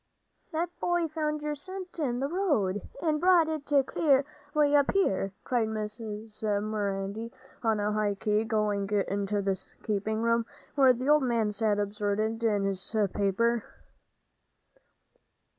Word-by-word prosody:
"That 335 +2 -1
boy 350 -1 +1
found 305 -1 -2
your 300 0 -1
cent 370 +4 -7
in 250 -5 -1
th' 275 +2 -1
road, 250 - +1 0.2
and 310 -2 +1
brought 355 -3 +5
it 310 -2 -4 0.2
clear 275 -3 +3 0.3
way 295 -1 +4
up 285 -1 +4
here," 195 - +1
cried 240 -3 +1
Mrs. 215 0 -6
Marindy, 205 0 -2 0.3
on 220 -2 +1
a 205 +1 0
high 210 -1 0
key, 210 +2 +1
going 210 -3 0 0.2
into 200 +1 -1
the 190 -1 -1 0.2
keeping 215 +1 -1
room, 230 0 +2 0.3
where 270 -3 +6
the 250 +2 -4
old 300 0 +6
man 230 -4 +1
sat 210 0 +1
absorbed 210 +2 -1
in 210 -3 +2
his 195 +2 -2 0.2
paper. 225 +3 +1
225 Hz, 140 wpm, -29 LUFS, 205-290 Hz, 0.3 s, where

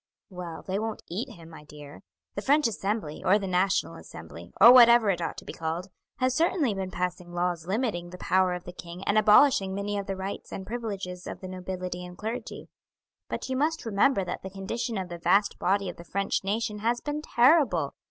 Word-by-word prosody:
"Well, 180 -3 -7
they 190 +1 -2
won't 220 0 -4
eat 190 +8 -3
him, 165 -1 -13
my 160 - -12
dear. 150 -1 -12 0.3
The 200 - -4
French 290 +3 +3
Assembly, 205 -7 -3
or 195 +3 +5
the 200 - -4
National 185 +1 +1
Assembly, - - -11
or 235 - +10
whatever 235 -4 +7
it 175 -2 -3
ought 165 - -3
to - - -9
be - - -7
called, 165 +4 -4 0.3
has 255 -1 +1
certainly 315 - +1
been 190 -1 -4
passing 180 -1 -4
laws 175 -2 -1
limiting 195 -5 -1
the 180 - -9
power 185 0 +2
of 180 - -7
the 180 - -9
king 175 +2 -9
and 200 - +1
abolishing 210 -2 +5
many 200 +1 -2
of 200 - -6
the 195 - -2
rights 190 +1 -6
and 190 - -6
privileges 195 -6 -5
of - - -6
the 185 - -8
nobility 185 -1 -5
and 180 0 -10
clergy; 225 +2 -5 0.6
but - - -4
you 260 - -2
must 310 +3 0
remember 205 0 +2
that 180 - -5
the 190 - -7
condition 205 +4 -4
of 190 -1 -3
the 175 -1 -8
vast 200 +4 +2
body 195 +1 +1
of 180 - -6
the 170 - -10
French 195 +3 -1
nation 210 +2 -2
has 235 +3 0
been 295 +2 -4
terrible. 245 - +3
195 Hz, 210 wpm, -27 LUFS, 180-225 Hz, 0.6 s, or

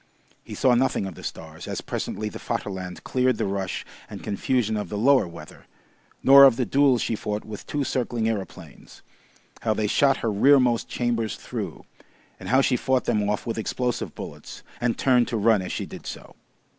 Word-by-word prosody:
He - - -8
saw 130 - +3
nothing 120 -4 +1
of 95 - -6
the - - -12
stars, - - -8
as - - -3
presently 110 - -4
the 105 - -7
Vaterland 95 -3 -5
cleared 130 -2 +1
the - - -1
rush 95 -1 -3 0.2
and - - -9
confusion 110 +2 0
of 105 - -3
the 105 - -4
lower 130 -2 +4
weather, 85 - -12 0.6
nor 140 +1 +9
of 130 -4 +6
the 125 - 0
duel 135 +3 +3
she 115 - -1
fought 105 0 -4
with 105 -2 -9
two 145 -1 -1
circling 120 -3 -1
aeroplanes, 105 -4 -6 0.6
how 110 -2 0
they 105 - 0
shot 135 +6 +3
her 110 - +1
rear 135 +8 +5
most 120 -2 +1
chambers 115 -4 -1
through, - - -6 0.5
and - - -7
how 130 +2 +5
she 135 - +2
fought 130 0 +1
them 105 -3 +1
off 105 - -2
with 115 -1 -3
explosive 125 +2 -2
bullets - - -9 0.2
and 120 -1 0
turned 125 -3 +3
to 115 - -2
run 110 -1 +3
as 90 - -5
she - - -3
did - - -10
so. - - -9
115 Hz, 195 wpm, -25 LUFS, 105-130 Hz, 0.6 s, nor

